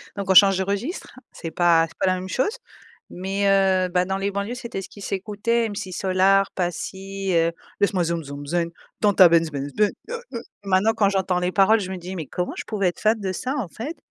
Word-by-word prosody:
donc, 200 -1 -5
on - - +5
change 195 0 +7
de 190 - 0
registre, 200 - -4
c'est 165 - -7
pas 170 0 +4
c'est - - -20
pas - - 0
la 185 - +3
même 185 +1 -6
chose. 415 - 0 0.5
Mais, 195 +2 -2
heu, 190 -2 +3
bah, 180 0 +1
dans 190 +1 -2
les 195 +1 -1
banlieues, 200 +4 -3
c'était 235 -6 -6
ce - - -10
qui 205 - -13
s'écoutait, 210 +4 -1
M6 195 -2 -6
Solar, 190 +1 +2
Passi, 190 +2 -4
heu, 165 0 +2 0.3
Laisse-moi 195 -3 +2
zoum 170 0 -2
zoum 140 0 -8
zen, 170 +3 -1 0.3
dans 205 -1 +4
ta 185 -2 +8
benz 165 -1 +3
benz 140 -1 -5
benz, 210 -1 +2 0.2
heu, 475 - -3 0.2
heu. 235 - -4 0.2
Maintenant, 195 +3 +3
quand 205 -3 +2
j'entends 190 -2 0
les 180 +1 -1
paroles, 215 +2 +5
je 190 -3 -5
me 190 - -4
dis: 180 +2 -7
«Mais 160 - -4
comment 180 +6 -3
je - - -5
pouvais 200 -4 0
être 175 - -9
fan 220 +1 +2
de 190 -2 -2
ça, 255 +9 -3
en 215 -11 -3
fait?» 285 - -6
190 Hz, 235 wpm, -23 LUFS, 180-205 Hz, 0.5 s, ta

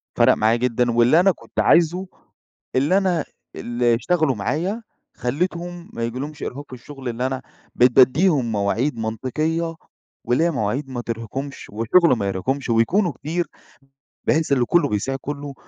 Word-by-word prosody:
فرق - - +5
معايا 110 +2 +2
جدًا. 120 0 +1
واللي 120 +7 +4
أنا 195 +2 +5
كنت - - -8
عايزه 175 +3 +3 0.7
اللي 145 +9 +3
أنا 180 -5 +1 0.3
اللي 120 0 +1
اشتغلوا 155 +1 +1
معايا، 170 - -2 0.3
خليتهم 175 +6 -3
ما 115 - -4
يجيلهمش 140 +6 -5
إرهاق 145 +3 -5
في - - -11
الشغل، 135 +2 -11
لأن 120 0 -4
أنا 130 0 -1 0.3
بقيت 125 +1 +5
باديهم 130 0 +4
مواعيد 110 +6 0
منطقية 155 +9 -2 0.5
واللي 125 +7 +2
هي 170 - +2
مواعيد 130 +2 -2
ما 125 -2 -4
ترهقهمش 120 +5 -6
وشغل 120 - +3
ما 100 -2 -2
يرهقهمش، 125 +9 -2
ويكونوا 160 - +2
كتير 170 +4 -3 0.8
بحيث 155 -2 +1
إن 125 -3 +3
كله 145 +2 +2
بيساعد 135 +6 -2
كله، 145 -1 -5
135 Hz, 150 wpm, -22 LUFS, 120-165 Hz, 0.8 s, فرق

